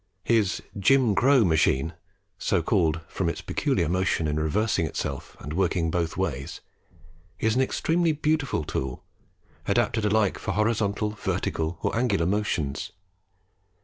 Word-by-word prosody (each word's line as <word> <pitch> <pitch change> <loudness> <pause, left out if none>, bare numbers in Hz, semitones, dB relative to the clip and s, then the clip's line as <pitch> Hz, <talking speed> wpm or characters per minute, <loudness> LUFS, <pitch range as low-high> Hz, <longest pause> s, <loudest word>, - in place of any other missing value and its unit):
His 110 -3 +1 0.2
"Jim 120 +3 +4
Crow 125 +3 +4
Machine," 80 -2 +2 0.5
so 90 -4 +1
called 80 -4 +1
from 90 -3 -2
its - - -4
peculiar - - 0
motion 90 -2 +1
in 75 0 -1
reversing 85 +2 +1
itself 70 -2 -5
and 75 - -6
working 85 -2 +1
both 85 -1 -1
ways, 75 -9 -3 0.8
is 110 +2 +1
an 130 - +3
extremely 165 +5 +1
beautiful 150 - 0
tool, 65 -3 -4 0.6
adapted 110 - +1
alike 105 -1 +2
for 95 - -3
horizontal, 105 0 0
vertical, 80 -5 -2
or - - 0
angular 110 -8 +1
motions. 90 -7 -1
95 Hz, 130 wpm, -26 LUFS, 80-110 Hz, 0.8 s, Jim